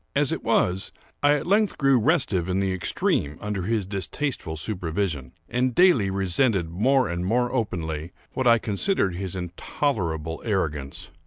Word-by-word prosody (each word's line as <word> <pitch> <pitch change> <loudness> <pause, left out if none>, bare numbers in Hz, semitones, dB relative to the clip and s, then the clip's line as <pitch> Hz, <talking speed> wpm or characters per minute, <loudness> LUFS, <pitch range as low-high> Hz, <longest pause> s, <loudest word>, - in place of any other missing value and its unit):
As - - +2
it - - -3
was, 90 +2 +1 0.3
I 145 0 +5
at 145 - -3
length 205 +3 +2
grew 135 -3 +4
restive 115 - +1
in 95 +1 +1
the 95 -1 0
extreme 80 -4 0
under 105 -2 -3
his 105 +1 0
distasteful 100 - -3
supervision, 80 - -3
and 125 0 0
daily 175 - +5
resented 95 -1 +1
more 130 +9 +3
and 85 +1 -3
more 120 +6 +1
openly 85 - -2 0.2
what 130 -1 0
I 115 0 +7
considered 105 - 0
his 95 +1 -5
intolerable 85 - -2
arrogance. 75 -10 -2
95 Hz, 150 wpm, -25 LUFS, 85-125 Hz, 0.3 s, I